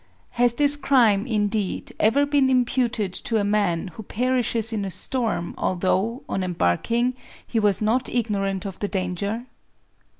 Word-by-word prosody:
Has 240 Hz, 0 st, +2 dB
this 290 Hz, +1 st, +5 dB
crime, 235 Hz, -7 st, +3 dB
indeed, 210 Hz, -3 st, -1 dB
ever 260 Hz, +7 st, +3 dB
been 285 Hz, -2 st, +2 dB
imputed 245 Hz, -5 st, +1 dB
to 225 Hz, -, -1 dB
a 210 Hz, -, +1 dB
man 200 Hz, -4 st, 0 dB
who 180 Hz, -, -10 dB
perishes 235 Hz, 0 st, -1 dB
in 210 Hz, -2 st, -1 dB
a 195 Hz, -, -3 dB
storm, 220 Hz, -4 st, -2 dB
although, 190 Hz, +7 st, 0 dB
on 195 Hz, -, -2 dB
embark 165 Hz, -, 0 dB
ing, 240 Hz, +2 st, +2 dB, 0.3 s
he 230 Hz, -, -1 dB
was 210 Hz, -1 st, +1 dB
not 245 Hz, +4 st, +1 dB
ignorant 200 Hz, -4 st, -1 dB
of 195 Hz, -2 st, -6 dB
the 205 Hz, -, -1 dB
danger? 200 Hz, +5 st, -3 dB
220 Hz, 155 wpm, -23 LUFS, 195-245 Hz, 0.3 s, this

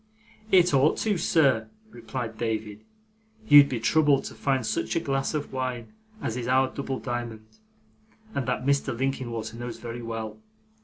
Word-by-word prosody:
'It 180 Hz, -4 st, +5 dB
ought 140 Hz, +3 st, +4 dB
to, 215 Hz, -2 st, +1 dB
sir,' 135 Hz, -10 st, +2 dB, 0.2 s
replied 120 Hz, -1 st, -6 dB
David. 110 Hz, -2 st, -3 dB, 0.6 s
'You'd 145 Hz, -5 st, +9 dB
be 125 Hz, -, -2 dB
troubled 145 Hz, +3 st, +3 dB
to -, -, -7 dB
find 135 Hz, -4 st, 0 dB
such 110 Hz, 0 st, -1 dB
a -, -, +3 dB
glass 135 Hz, -1 st, -1 dB
of 145 Hz, -2 st, -4 dB
wine 130 Hz, -, -4 dB, 0.3 s
as 110 Hz, -, -2 dB
is 125 Hz, -1 st, -4 dB
our 130 Hz, +1 st, +2 dB
double 135 Hz, -1 st, -3 dB
diamond, 120 Hz, -3 st, -5 dB, 0.9 s
and 135 Hz, -7 st, -2 dB
that 125 Hz, 0 st, -1 dB
Mr. 140 Hz, -4 st, +1 dB
Linkinwater 120 Hz, -4 st, -3 dB
knows 120 Hz, 0 st, -6 dB
very 120 Hz, 0 st, -7 dB
well. 115 Hz, -, -5 dB
125 Hz, 155 wpm, -26 LUFS, 115-140 Hz, 0.9 s, You'd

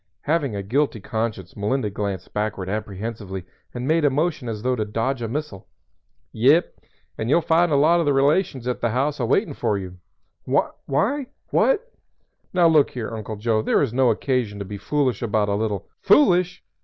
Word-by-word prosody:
Having 145 Hz, -7 st, 0 dB
a 100 Hz, -, -3 dB
guilty 130 Hz, +3 st, 0 dB
conscience 110 Hz, -3 st, -4 dB
Melinda 105 Hz, +2 st, -1 dB
glanced 100 Hz, -2 st, -4 dB
backward 105 Hz, -3 st, -2 dB
apprehensively 105 Hz, -2 st, -5 dB, 0.3 s
and 125 Hz, +1 st, -5 dB
made 160 Hz, +1 st, +2 dB
a 145 Hz, -, +5 dB
motion 145 Hz, -2 st, -1 dB
as 105 Hz, -1 st, -5 dB
though 130 Hz, 0 st, +1 dB
to 110 Hz, -, -1 dB
dodge 115 Hz, +5 st, -2 dB
a 115 Hz, -, -2 dB
missile. 140 Hz, -5 st, -5 dB, 0.6 s
"Yep; 140 Hz, +10 st, +3 dB, 0.5 s
and 110 Hz, -, -2 dB
you'll 170 Hz, +5 st, +4 dB
find 165 Hz, +1 st, +3 dB
a -, -, +3 dB
lot 160 Hz, +5 st, +4 dB
of 165 Hz, -, 0 dB
the -, -, +4 dB
relations 140 Hz, -1 st, +1 dB
at 125 Hz, -, -2 dB
the 120 Hz, -, +1 dB
house 140 Hz, +5 st, 0 dB
a 120 Hz, -, 0 dB
waitin' 165 Hz, -, +1 dB
for 110 Hz, -6 st, 0 dB
you." 90 Hz, -2 st, -7 dB, 0.5 s
"Why 250 Hz, -, 0 dB, 0.2 s
what? -, -, +2 dB, 0.6 s
Now 175 Hz, -2 st, +4 dB
look 155 Hz, -3 st, +4 dB
here, 115 Hz, -2 st, -5 dB
Uncle 110 Hz, 0 st, -5 dB
Joe, 110 Hz, +1 st, 0 dB
there 110 Hz, -, +2 dB
is 125 Hz, -5 st, -2 dB
no 130 Hz, -1 st, +3 dB
occasion 115 Hz, -2 st, 0 dB
to 100 Hz, -, -5 dB
be 100 Hz, +1 st, -7 dB
foolish 130 Hz, -1 st, 0 dB
about 105 Hz, -3 st, +1 dB
a -, -, +1 dB
little 100 Hz, -2 st, -2 dB
" -, -, -50 dB
"Foolish? 185 Hz, -, +4 dB
120 Hz, 190 wpm, -23 LUFS, 105-150 Hz, 0.6 s, a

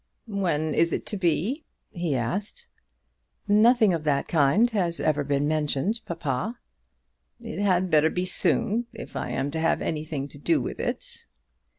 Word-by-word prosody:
"When 170 Hz, -7 st, 0 dB
is 170 Hz, +2 st, +2 dB
it -, -, -2 dB
to 215 Hz, -, -3 dB
be?" 190 Hz, -, 0 dB, 0.3 s
he 170 Hz, -5 st, -1 dB
asked. 155 Hz, -, -3 dB, 0.8 s
"Nothing 215 Hz, 0 st, +5 dB
of 165 Hz, -2 st, -2 dB
that 145 Hz, -2 st, +1 dB
kind 165 Hz, -, +4 dB
has 175 Hz, -6 st, 0 dB
ever 150 Hz, -1 st, +1 dB
been 140 Hz, +1 st, 0 dB
mentioned, 155 Hz, +7 st, 0 dB
papa." 165 Hz, -, -2 dB, 0.8 s
"It -, -, -6 dB
had 185 Hz, -2 st, +2 dB
better 155 Hz, +1 st, +5 dB
be 180 Hz, +2 st, -2 dB
soon, 215 Hz, +5 st, +1 dB
if -, -, -9 dB
I -, -, -3 dB
am 140 Hz, +1 st, -2 dB
to 160 Hz, -, -3 dB
have 165 Hz, +1 st, +2 dB
anything 150 Hz, -3 st, -3 dB
to 145 Hz, -, -13 dB
do 310 Hz, -, +2 dB
with -, -, -5 dB
it." -, -, -4 dB
170 Hz, 160 wpm, -26 LUFS, 150-205 Hz, 0.8 s, Nothing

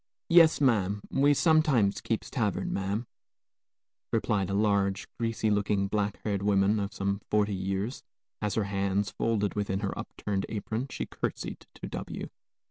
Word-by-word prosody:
"Yes, 165 Hz, -2 st, +7 dB
ma'am; 105 Hz, -7 st, +2 dB
we 145 Hz, +2 st, +4 dB
sometimes 150 Hz, -, +3 dB
keeps -, -, -2 dB
tavern, -, -, -1 dB
ma'am," 100 Hz, +5 st, -1 dB, 1.1 s
replied 100 Hz, -3 st, +1 dB
a 100 Hz, -, -1 dB
large, 100 Hz, -2 st, +1 dB
greasy 115 Hz, -2 st, 0 dB
looking, 100 Hz, -1 st, +1 dB
black 105 Hz, 0 st, -1 dB
haired 100 Hz, -2 st, -1 dB
woman 100 Hz, +1 st, +3 dB
of 100 Hz, -1 st, -2 dB
some 100 Hz, +1 st, -2 dB
forty 105 Hz, -1 st, +2 dB
years, 95 Hz, +5 st, -2 dB, 0.4 s
as, 105 Hz, -2 st, -1 dB
her 110 Hz, -, +2 dB
hands 100 Hz, 0 st, 0 dB
folded 105 Hz, -3 st, 0 dB
within 100 Hz, -2 st, -1 dB
her 100 Hz, -, -2 dB
up -, -, -5 dB
turned 100 Hz, -2 st, -2 dB
apron, 110 Hz, +4 st, -3 dB
she -, -, -4 dB
courtesied -, -, -5 dB
to -, -, -7 dB
W -, -, -6 dB
105 Hz, 150 wpm, -29 LUFS, 100-110 Hz, 1.1 s, Yes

